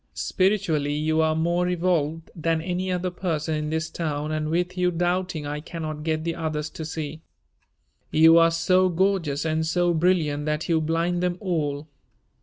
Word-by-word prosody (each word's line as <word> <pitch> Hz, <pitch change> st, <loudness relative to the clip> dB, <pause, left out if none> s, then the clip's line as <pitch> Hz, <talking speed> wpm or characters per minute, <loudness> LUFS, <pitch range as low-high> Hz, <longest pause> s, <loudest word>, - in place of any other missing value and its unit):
Spiritually 180 Hz, -7 st, +1 dB
you 155 Hz, +1 st, +1 dB
are 160 Hz, 0 st, +2 dB
more 170 Hz, +2 st, +1 dB
evolved 165 Hz, -3 st, 0 dB
than 165 Hz, -1 st, 0 dB
any 180 Hz, +2 st, -2 dB
other 180 Hz, 0 st, -1 dB
person 165 Hz, -3 st, -2 dB
in 150 Hz, 0 st, -2 dB
this 160 Hz, 0 st, -1 dB
town 150 Hz, -2 st, -3 dB
and 155 Hz, 0 st, -2 dB
with 180 Hz, +2 st, -1 dB
you 180 Hz, -1 st, +2 dB
doubting 175 Hz, -2 st, -1 dB
I 145 Hz, +1 st, -3 dB
cannot 155 Hz, -1 st, -6 dB
get 155 Hz, 0 st, -1 dB
the 165 Hz, 0 st, -1 dB
others 155 Hz, -2 st, -3 dB
to 160 Hz, -, -6 dB
see. 155 Hz, -1 st, -5 dB, 0.9 s
You 160 Hz, +1 st, +6 dB
are 165 Hz, 0 st, +6 dB
so 185 Hz, +2 st, +3 dB
gorgeous 175 Hz, -5 st, 0 dB
and 160 Hz, 0 st, 0 dB
so 175 Hz, +2 st, +1 dB
brilliant 155 Hz, -4 st, +1 dB
that 150 Hz, +1 st, -1 dB
you 165 Hz, -2 st, +2 dB
blind 165 Hz, +3 st, 0 dB
them 180 Hz, -1 st, 0 dB
all. 155 Hz, -6 st, -2 dB
165 Hz, 170 wpm, -25 LUFS, 155-175 Hz, 0.9 s, You